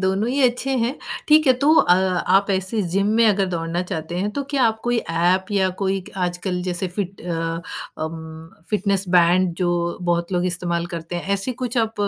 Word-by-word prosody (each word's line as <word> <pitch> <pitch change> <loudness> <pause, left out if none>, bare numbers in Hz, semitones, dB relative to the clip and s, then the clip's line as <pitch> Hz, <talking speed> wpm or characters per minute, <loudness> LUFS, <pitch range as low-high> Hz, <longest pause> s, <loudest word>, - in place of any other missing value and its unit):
दोनों 190 +4 0
ही 275 +3 0
अच्छे 250 +2 +1
हैं 235 +4 -1 0.3
ठीक 305 0 +6
है 260 - +7
तो 290 +4 +4
अ, 180 - +5
आप 190 +2 +2
ऐसे 190 +3 0
जिम 200 +1 +2
में 230 - +5
अगर 200 -2 +3
दौड़ना 170 0 -2
चाहते 165 -1 -5
हैं 200 +3 -1
तो 280 +6 -3
क्या 280 -3 +1
आप 220 -1 +1
कोई 240 0 +1
एप 175 +3 +2
या 195 -2 +2
कोई 195 -1 -1
आजकल 180 0 -2
जैसे 180 0 -2
फिट 195 -2 -4
अ, 165 -1 -3 0.4
उम, 160 0 -8 0.2
फिटनेस 200 -2 +1
बैंड 175 +1 +4
जो 175 -1 0
बहुत 170 +1 0
लोग 180 0 +1
इस्तेमाल 175 -1 -2
करते 170 -1 -6
हैं 190 +3 -2
ऐसे 200 +6 -2
कुछ 245 0 -1
आप 225 -1 0
185 Hz, 195 wpm, -22 LUFS, 175-210 Hz, 0.4 s, है